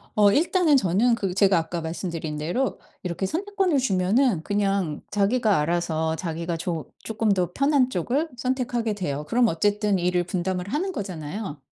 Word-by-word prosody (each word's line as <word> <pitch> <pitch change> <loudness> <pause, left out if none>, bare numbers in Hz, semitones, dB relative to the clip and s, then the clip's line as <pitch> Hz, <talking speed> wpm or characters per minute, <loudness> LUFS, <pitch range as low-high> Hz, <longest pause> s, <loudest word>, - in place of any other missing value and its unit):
어 205 -1 +5
일단은 335 - +3
저는 225 +4 +2
그 195 -5 -2
제가 195 -2 +4
아까 165 +1 -2
말씀드린 160 -2 -4
대로 175 - -1 0.2
이렇게 180 +2 -2
선택권을 380 - 0
주면은 205 - +2
그냥 195 -6 0
자기가 210 -1 +2
알아서 160 0 0
자기가 170 0 -3
조 165 -1 -4
쪼끔 220 -1 0
더 180 -2 +1
편한 275 -2 +3
쪽을 260 - -1
선택하게 245 -3 -1
돼요. 150 -7 -3
그럼 240 0 +3
어쨌든 205 +3 +1
일을 180 0 +1
분담을 180 +1 -2
하는 360 +8 -1
거잖아요. 180 - -5
195 Hz, 350 characters per minute, -24 LUFS, 170-245 Hz, 0.2 s, 어